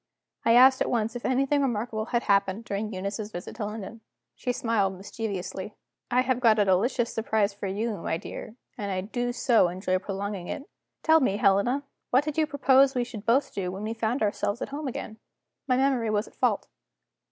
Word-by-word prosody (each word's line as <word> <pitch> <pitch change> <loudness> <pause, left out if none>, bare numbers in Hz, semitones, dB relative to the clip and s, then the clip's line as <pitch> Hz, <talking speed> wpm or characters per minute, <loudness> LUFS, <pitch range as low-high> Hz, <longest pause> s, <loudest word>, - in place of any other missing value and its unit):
I 230 - +4
asked 260 +2 +7
at - - +1
once 225 -1 0
if 245 - -5
anything 275 +2 +2
remarkable 225 -4 -1
had 240 0 0
happened 200 +2 +1
during 210 +1 -3
Eunice's 200 +2 -4
visit 175 0 -7
to 215 - -2
London. 215 +1 -7 0.3
She 250 - -2
smiled 225 -7 0
mischievously. 195 0 -5 0.3
"I 250 0 +3
have 255 -1 0
got 225 -3 +5
a 205 - +4
delicious 230 +6 +1
surprise 220 -2 +1
for 200 0 -5
you, 210 +3 -2
my 165 - -2
dear; 215 - -8 0.2
and 200 -1 -3
I 185 -1 -1
do 245 +5 -2
so 240 -5 +3
enjoy 185 +1 -1
prolonging 195 -1 -4
it. 280 - -4 0.4
Tell 320 0 +6
me, 230 -9 +1
Helena, 210 +8 +2 0.3
what 260 +3 +4
did 305 -1 -3
you 315 -1 +2
propose 275 -2 +4
we 245 - +2
should 225 -3 -9
both 270 +4 +2
do 185 -2 -2
when 190 +2 -6
we 220 +1 -2
found 230 +2 -1
ourselves 205 +1 -1
at - - -4
home 290 +1 -4
again?" 220 -3 -6 0.5
My 255 -2 +3
memory 260 -4 +2
was 210 +1 0
at - - -17
fault. - - +1
220 Hz, 195 wpm, -27 LUFS, 200-250 Hz, 0.5 s, asked